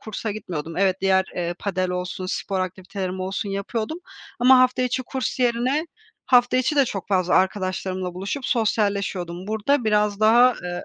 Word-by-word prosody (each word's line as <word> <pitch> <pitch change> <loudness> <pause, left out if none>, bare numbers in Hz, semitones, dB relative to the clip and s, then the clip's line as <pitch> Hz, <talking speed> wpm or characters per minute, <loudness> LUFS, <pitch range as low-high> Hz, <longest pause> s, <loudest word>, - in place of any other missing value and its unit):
kursa 215 0 -5
gitmiyordum. 165 -6 -6
Evet, 190 -1 +2
diğer, 190 -1 +3
eee, 175 0 -2
padel 185 -2 -2
olsun, 180 +1 -4
spor 190 +1 -2
aktivitelerim 185 0 -4
olsun 195 +2 -3
yapıyordum 215 - -3 0.4
ama 255 +1 +7
hafta 255 0 +3
içi 250 +1 -1
kurs 260 +1 -4
yerine, 250 +6 +1 0.4
hafta 245 0 +4
içi 260 +4 +1
de 280 - +5
çok 195 -5 -5
fazla 185 -2 +2
arkadaşlarımla 185 -1 -1
buluşup 200 +9 -4
sosyalleşiyordum. 200 -5 -1
Burada 220 +4 +1
biraz 210 -1 +1
daha, 240 +3 +6
eee, 175 0 -4
200 Hz, 155 wpm, -23 LUFS, 185-240 Hz, 0.4 s, ama